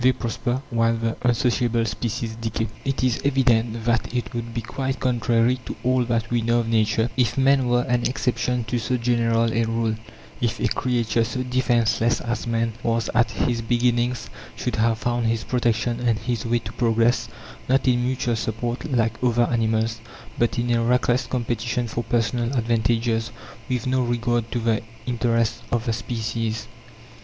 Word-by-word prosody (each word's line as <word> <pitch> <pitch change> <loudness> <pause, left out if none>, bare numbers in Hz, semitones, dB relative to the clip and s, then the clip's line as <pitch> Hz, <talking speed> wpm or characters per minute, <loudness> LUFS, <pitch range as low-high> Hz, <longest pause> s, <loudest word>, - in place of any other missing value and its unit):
They 130 +1 +5
prosper, 120 +2 -2
while 115 0 +2
the 115 0 -1
unsociable 120 -1 +2
species 115 +1 -3
decay. 115 0 -2 0.2
It 135 -2 -1
is 125 -3 +1
evident 120 -5 +2
that 115 -1 +1
it 125 -1 -3
would 120 0 -4
be 115 0 -3
quite 130 +3 -3
contrary 120 0 +2
to - - -4
all 125 0 +2
that 115 -1 -1
we 120 -1 +2
know 120 +1 +2
of 115 - -5
nature 110 +1 +2
if 125 -1 +2
men 135 -1 +4
were 120 0 +3
an 120 0 +1
exception 125 -1 0
to 120 +2 -2
so 125 +2 0
general 115 -1 +2
a 115 - +2
rule: 115 0 0 0.5
if 120 -2 0
a - - +2
creature 120 -2 +1
so 130 +3 -2
defenceless 120 -2 +2
as 120 0 -3
man 115 0 0
was 115 -1 0
at 120 0 +3
his 120 -1 -1
beginnings 120 +1 +1 0.3
should - - -3
have 115 0 +2
found 120 0 0
his 115 -1 0
protection 120 -1 0
and 120 -3 +1
his 115 0 -3
way 120 +1 +2
to 110 -1 -6
progress, 115 0 +2 0.4
not 135 +1 +3
in 120 -1 +3
mutual 125 -2 0
support, 120 +6 -3
like 115 -2 0
other 120 -1 +3
animals, 115 -1 0 0.3
but 120 0 0
in 120 0 0
a 115 -1 +2
reckless 125 +1 +2
competition 120 -1 -1
for 115 +2 -3
personal 120 +1 0
advantages, 115 0 +1 0.4
with 125 -3 -1
no 130 0 +1
regard 120 -1 0
to - - -1
the 115 -2 +1 0.2
interests 115 -1 0
of 120 0 0
the 115 - 0
species. 115 -1 -3
120 Hz, 170 wpm, -23 LUFS, 115-125 Hz, 0.5 s, They